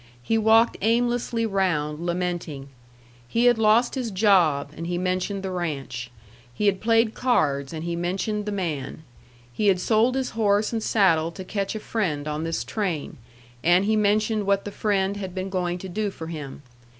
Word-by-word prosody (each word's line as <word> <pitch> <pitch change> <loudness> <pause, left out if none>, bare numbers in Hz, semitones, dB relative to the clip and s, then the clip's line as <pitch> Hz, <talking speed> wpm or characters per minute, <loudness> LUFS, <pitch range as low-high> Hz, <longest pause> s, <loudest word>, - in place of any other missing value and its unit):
He 225 - 0
walked 225 +1 +4
aimlessly 235 +1 +1
round, 170 -7 -1
lamenting. 175 -5 -3 0.6
He 230 - +1
had 240 -2 +5
lost 225 +3 +4
his 255 -4 -2
job, 180 -9 +3
and 165 +1 -5
he 175 0 -1
mentioned 185 +2 -2
the 190 - -3
ranch. 140 -8 -4 0.4
He 210 - -3
had 195 -2 +2
played 225 0 +3
cards, 140 - +1
and 160 -1 -5
he 170 0 -2
mentioned 195 +5 -2
the - - -1
man. 160 -6 -4 0.5
He 210 - 0
had 190 -2 +4
sold 225 +6 +2
his 265 -1 -1
horse 215 0 +1
and 225 - -1
saddle 175 -7 +3
to 190 - -7
catch 195 +2 -3
a - - -3
friend 165 -10 -2
on 150 +1 -3
this 165 - -2
train, 185 -9 -3 0.5
and 175 +3 +4
he 220 +1 +2
mentioned 215 0 +1
what 200 0 +2
the 205 - -5
friend 200 -1 0
had 190 -2 -6
been 190 +1 -4
going 180 -2 -1
to 190 - -8
do 210 +3 -2
for 165 -4 -8
him. 150 -4 -7
195 Hz, 180 wpm, -24 LUFS, 170-215 Hz, 0.6 s, had